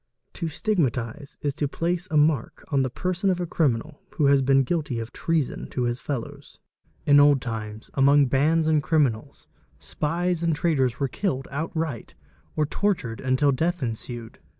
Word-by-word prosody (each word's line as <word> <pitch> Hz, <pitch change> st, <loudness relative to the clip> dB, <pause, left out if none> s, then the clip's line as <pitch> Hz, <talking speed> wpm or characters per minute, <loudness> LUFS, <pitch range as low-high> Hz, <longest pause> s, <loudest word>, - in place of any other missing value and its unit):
"To 170 Hz, -, -3 dB
stigmatise'' 145 Hz, -, -2 dB
is 145 Hz, -1 st, 0 dB
to 145 Hz, 0 st, -1 dB
place 175 Hz, +5 st, -2 dB
a 155 Hz, -, +1 dB
mark 150 Hz, -5 st, +1 dB
on 140 Hz, -3 st, +2 dB
the 130 Hz, -, 0 dB
person 185 Hz, +8 st, -1 dB
of 180 Hz, -1 st, +1 dB
a 175 Hz, -, -1 dB
criminal 150 Hz, -3 st, -1 dB
who 150 Hz, -, +1 dB
has 140 Hz, 0 st, +5 dB
been 135 Hz, 0 st, +4 dB
guilty 150 Hz, -4 st, -2 dB
of 115 Hz, 0 st, -5 dB
treason 160 Hz, -5 st, -1 dB
to 125 Hz, -, -2 dB
his 120 Hz, 0 st, -1 dB
fellows. 145 Hz, +2 st, -6 dB, 0.5 s
In 145 Hz, 0 st, +6 dB
old 145 Hz, -1 st, +6 dB
times, 110 Hz, -3 st, -6 dB
among 140 Hz, +1 st, +5 dB
bands 155 Hz, +5 st, +2 dB
of 160 Hz, -, +3 dB
© 150 Hz, -, +3 dB
criminals, 140 Hz, -8 st, 0 dB, 0.3 s
spies 170 Hz, +3 st, -2 dB
and 165 Hz, -2 st, +1 dB
traitors 135 Hz, -7 st, +1 dB
were 140 Hz, -, +1 dB
killed 135 Hz, -4 st, -2 dB
outright 155 Hz, -3 st, -4 dB, 0.4 s
or 155 Hz, -, +2 dB
tortured 150 Hz, -, -1 dB
until 130 Hz, +2 st, +2 dB
death 165 Hz, +4 st, -1 dB
ensued. 115 Hz, 0 st, -6 dB
145 Hz, 170 wpm, -25 LUFS, 130-160 Hz, 0.5 s, In